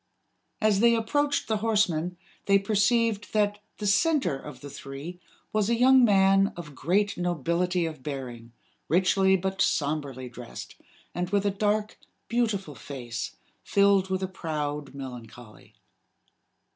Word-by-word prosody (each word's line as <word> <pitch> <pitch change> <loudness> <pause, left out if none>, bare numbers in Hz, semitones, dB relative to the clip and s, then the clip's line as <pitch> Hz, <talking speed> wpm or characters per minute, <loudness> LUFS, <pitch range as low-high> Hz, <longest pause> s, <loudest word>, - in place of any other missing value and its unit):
As 215 -3 +3
they 235 +1 +5
approached 285 +6 0
the 220 - +1
horsemen, 185 -6 0 0.3
they 200 0 +6
perceived 210 +1 +1
that 205 -1 +1 0.2
the 210 - -5
center 265 - +2
of 145 +2 -10
the 145 - -8
three 140 +8 -8 0.3
was 215 0 +1
a 235 - +2
young 260 +1 +6
man 195 -2 +4
of 155 -4 -8
great 195 +9 0
nobility 175 +1 0
of 155 -4 -6
bearing, 125 -4 -6 0.4
richly 190 +2 +3
but 190 +1 -2
somberly 140 -6 -1
dressed, 125 -1 -9 0.4
and 180 0 -2
with 200 0 +1
a 200 - +2
dark, 210 +1 -1 0.3
beautiful 220 -9 -1
face 120 -2 -6 0.3
filled 200 -1 +3
with 190 0 -1
a - - 0
proud 150 -6 -4
melancholy. 120 -4 -10
190 Hz, 135 wpm, -27 LUFS, 150-210 Hz, 0.4 s, they